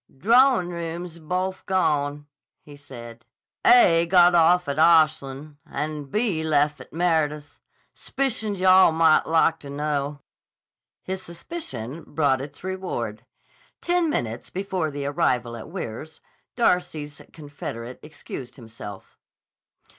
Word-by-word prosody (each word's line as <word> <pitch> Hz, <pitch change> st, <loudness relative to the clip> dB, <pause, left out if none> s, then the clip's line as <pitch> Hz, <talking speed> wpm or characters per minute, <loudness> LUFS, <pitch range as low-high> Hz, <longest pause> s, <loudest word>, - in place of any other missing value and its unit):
"Drawin' 235 Hz, -, +4 dB
rooms 170 Hz, 0 st, -6 dB
is -, -, -15 dB
bofe 185 Hz, +4 st, -3 dB
gone," 145 Hz, -6 st, 0 dB, 0.4 s
he 145 Hz, -, -13 dB
said. 120 Hz, -5 st, -11 dB, 0.4 s
"A 170 Hz, -9 st, +6 dB
got 175 Hz, 0 st, +6 dB
off 175 Hz, +1 st, +4 dB
at 140 Hz, +1 st, -2 dB
Ashlan' 155 Hz, -3 st, +2 dB
an' 150 Hz, 0 st, -5 dB
B 200 Hz, -, 0 dB
lef' 150 Hz, -2 st, +1 dB
at -, -, -14 dB
Meredith. 155 Hz, -3 st, -1 dB, 0.3 s
S'pi 275 Hz, 0 st, -2 dB
cioned 215 Hz, -4 st, -3 dB
you 185 Hz, -, -2 dB
all 185 Hz, -2 st, +7 dB
might 160 Hz, -1 st, +4 dB
lak 165 Hz, 0 st, +2 dB
to 140 Hz, -, -11 dB
know." 145 Hz, 0 st, -3 dB, 0.8 s
His 190 Hz, 0 st, -4 dB
suspicion 165 Hz, -, -7 dB
brought 140 Hz, -4 st, 0 dB
its 145 Hz, +3 st, -9 dB
reward. 185 Hz, -, -5 dB, 0.5 s
Ten 350 Hz, -1 st, +1 dB
minutes 115 Hz, -, -3 dB
before 190 Hz, -4 st, -2 dB
the 145 Hz, -1 st, -5 dB
arrival 130 Hz, -6 st, 0 dB
at 115 Hz, -, -9 dB
Weirs, 155 Hz, -, -7 dB, 0.4 s
Darcy's 175 Hz, -, 0 dB
confederate 130 Hz, -5 st, -8 dB
excused 135 Hz, -4 st, -9 dB
himself. 110 Hz, -5 st, -11 dB
155 Hz, 125 wpm, -24 LUFS, 140-180 Hz, 0.8 s, all